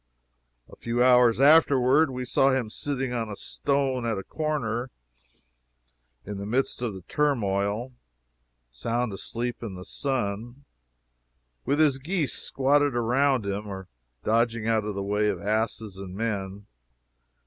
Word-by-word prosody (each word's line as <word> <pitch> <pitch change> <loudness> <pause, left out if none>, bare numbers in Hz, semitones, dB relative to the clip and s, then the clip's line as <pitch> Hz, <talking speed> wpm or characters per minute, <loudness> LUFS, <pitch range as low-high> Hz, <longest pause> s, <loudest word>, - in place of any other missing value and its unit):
A - - -14
few 120 +1 0
hours 125 -2 +5
afterward 140 0 +5
we 125 -1 -4
saw 135 +2 +3
him 130 -5 0
sitting 135 -2 -3
on 115 -2 -2
a 105 - -5
stone 135 +1 -1
at 115 -3 -1
a 95 - -4
corner, 130 -6 -2 1.4
in 100 0 -6
the 100 - -5
midst 125 +2 0
of 115 -5 -2
the 95 - -10
turmoil, 110 -2 0 0.8
sound 115 - -2
asleep 120 +5 -4
in 110 -5 -6
the 90 0 -9
sun, 120 0 -3 1.0
with 140 - +1
his 145 -4 +4
geese 155 -2 -1
squatting 140 0 +1
around 125 0 +2
him, 100 +1 -3
or 95 -2 -7 0.3
dodging 115 0 +1
out 110 -2 +2
of 105 -2 -3
the 100 - -2
way 105 +1 +1
of 100 -4 -1
asses 110 0 -2
and 95 -1 -8
men. 100 -2 -3
120 Hz, 140 wpm, -26 LUFS, 105-135 Hz, 1.4 s, hours